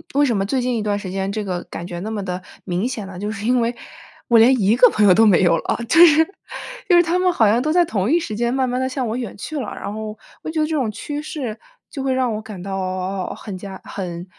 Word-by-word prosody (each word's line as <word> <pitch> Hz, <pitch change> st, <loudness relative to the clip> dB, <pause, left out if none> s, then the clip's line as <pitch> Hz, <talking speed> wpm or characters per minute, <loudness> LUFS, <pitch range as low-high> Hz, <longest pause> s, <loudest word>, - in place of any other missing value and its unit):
为 290 Hz, -, +4 dB
什 235 Hz, -6 st, +1 dB
么 195 Hz, -, 0 dB
最 255 Hz, +5 st, 0 dB
近 250 Hz, -1 st, 0 dB
一 220 Hz, -, -1 dB
段 205 Hz, -1 st, 0 dB
时 195 Hz, -2 st, -6 dB
间 195 Hz, +1 st, -2 dB
这 215 Hz, 0 st, -3 dB
个 180 Hz, -2 st, -4 dB
感 170 Hz, -, -7 dB
觉 175 Hz, -1 st, -6 dB
那 210 Hz, +4 st, -5 dB
么 210 Hz, -3 st, -3 dB
的 180 Hz, 0 st, -4 dB, 0.2 s
明 185 Hz, +5 st, -1 dB
显 230 Hz, -6 st, -5 dB
呢， 190 Hz, -2 st, -9 dB
就 205 Hz, +2 st, -3 dB
是 215 Hz, -1 st, -5 dB
因 250 Hz, +1 st, +3 dB
为 235 Hz, +1 st, 0 dB, 0.5 s
我 230 Hz, -1 st, +6 dB
连 255 Hz, +3 st, +6 dB
一 210 Hz, +5 st, +3 dB
个 250 Hz, -, +7 dB
朋 210 Hz, -, +2 dB
友 185 Hz, -, +7 dB
都 225 Hz, +4 st, +5 dB
没 200 Hz, -5 st, +5 dB
有 170 Hz, -1 st, +4 dB
了， -, -, -2 dB
就 335 Hz, +1 st, +8 dB
是 320 Hz, 0 st, +5 dB, 0.6 s
就 355 Hz, -, +5 dB
是 345 Hz, -, +7 dB
他 340 Hz, +2 st, 0 dB
们 365 Hz, -1 st, +2 dB
好 225 Hz, -, +4 dB
像 235 Hz, +3 st, +3 dB
都 310 Hz, +2 st, 0 dB
在 350 Hz, 0 st, +5 dB
同 210 Hz, -, -1 dB
一 335 Hz, -, +4 dB
时 275 Hz, -10 st, -4 dB
间 240 Hz, +1 st, 0 dB
慢 260 Hz, -1 st, +1 dB
慢 250 Hz, +1 st, -1 dB
地 260 Hz, -, 0 dB
向 260 Hz, -1 st, -2 dB
我 230 Hz, -, -2 dB
远 240 Hz, -5 st, -5 dB
去 295 Hz, +8 st, -5 dB
了。 220 Hz, -, -5 dB
然 205 Hz, -, -6 dB
后 215 Hz, 0 st, -6 dB, 0.2 s
我 -, -, -6 dB
觉 315 Hz, -1 st, -1 dB
得 -, -, +2 dB
这 315 Hz, -, -3 dB
种 265 Hz, -8 st, 0 dB
趋 290 Hz, +7 st, -5 dB
势， 265 Hz, -8 st, -5 dB, 0.3 s
就 275 Hz, -, -5 dB
会 265 Hz, -1 st, 0 dB
让 255 Hz, -3 st, 0 dB
我 215 Hz, -, -4 dB
感 210 Hz, -5 st, -9 dB
到 185 Hz, -1 st, -3 dB
很 200 Hz, -4 st, -7 dB
加 190 Hz, 0 st, -9 dB
很 175 Hz, -3 st, -6 dB
220 Hz, 305 characters per minute, -21 LUFS, 195-260 Hz, 0.6 s, 就